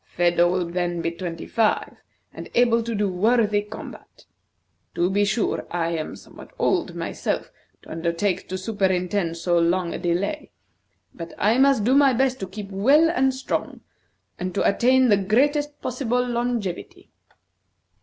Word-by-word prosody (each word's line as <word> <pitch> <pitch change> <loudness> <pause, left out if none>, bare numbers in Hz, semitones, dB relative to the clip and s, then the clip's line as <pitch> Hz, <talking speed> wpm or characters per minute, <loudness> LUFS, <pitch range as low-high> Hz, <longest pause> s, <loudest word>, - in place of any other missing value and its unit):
Phedo 175 0 +3
will 180 0 0
then 175 0 -2
be 165 0 -1
twenty 170 -1 -6
five, 225 -2 0 0.4
and - - -9
able 235 -1 +4
to 230 0 -4
do 205 0 +1
worthy 210 +2 +2
combat. 210 +1 -11 0.7
To 175 +2 +1
be 205 +1 +2
sure, 210 +2 -1
I 170 -1 -1
am 160 -2 -4
somewhat - - -14
old - - 0
myself - - -3 0.3
to - - -13
undertake 170 +4 -2
to 185 - -3
superintend 185 -3 -1
so 175 0 +1
long 170 +1 +1
a - - -4
delay, 190 - -2 0.6
but 165 -1 -9
I 220 +5 +2
must 270 -5 +4
do 245 +5 +3
my 275 -1 +5
best 260 +1 +1
to 190 - -4
keep 200 +1 -8
well 280 +12 +4
and 265 -5 +2
strong, 260 0 -4 0.6
and 185 +1 -4
to - - +2
attain 255 +4 +3
the 205 - +5
greatest 290 +9 +1
possible 250 -1 -1
longevity." 235 -6 -3
205 Hz, 155 wpm, -23 LUFS, 175-245 Hz, 0.7 s, my